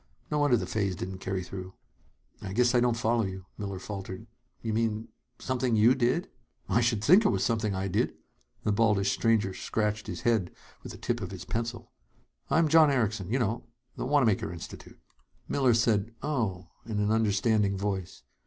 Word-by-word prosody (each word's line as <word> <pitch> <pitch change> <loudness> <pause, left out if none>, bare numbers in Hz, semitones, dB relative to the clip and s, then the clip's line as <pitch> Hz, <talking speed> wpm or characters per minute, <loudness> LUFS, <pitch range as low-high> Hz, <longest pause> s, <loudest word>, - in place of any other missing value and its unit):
No 150 - +1
wonder 145 -4 +4
the - - -3
phase 100 -4 -1
didn't 95 +2 -6
carry 95 -1 -3
through!" 95 0 -8 0.7
"I 95 -2 -5
guess 120 +3 +3
I 125 - +5
don't 120 -1 +2
follow 115 0 +1
you," 95 -1 -5
Miller 100 -2 -5
faltered. 95 +1 -7 0.4
"You 110 -1 -1
mean 110 0 -1 0.3
something 130 -2 0
you 110 +4 +6
did 130 +6 +1 0.2
" - - -43
"I - - +4
should 115 -3 +1
think 185 - +7
it 205 - +4
was - - 0
something 110 -4 0
I 95 +1 -2
did!" 90 - 0 0.5
The 105 - +1
baldish 100 -2 +2
stranger 110 -4 +2
scratched 105 +2 -2
his - - -5
head 110 -7 +2 0.3
with - - -8
the - - -10
tip 120 -1 -2
of 95 - -4
his 90 -2 -8
pencil. 115 +4 -4 0.6
"I'm 165 0 +4
John 155 0 +6
Erickson 110 -8 0
you 125 - +2
know, 115 -2 -1 0.3
the - - -4
Wanamaker 130 -11 +2
Institute." 85 -1 -10 0.5
Miller 130 -4 +3
said: 115 -1 +1
"Oh!" 105 - -2
in 110 -2 -3
an 105 +1 +1
understanding 105 -2 +2
voice. 95 -2 -3
110 Hz, 180 wpm, -29 LUFS, 100-120 Hz, 0.7 s, think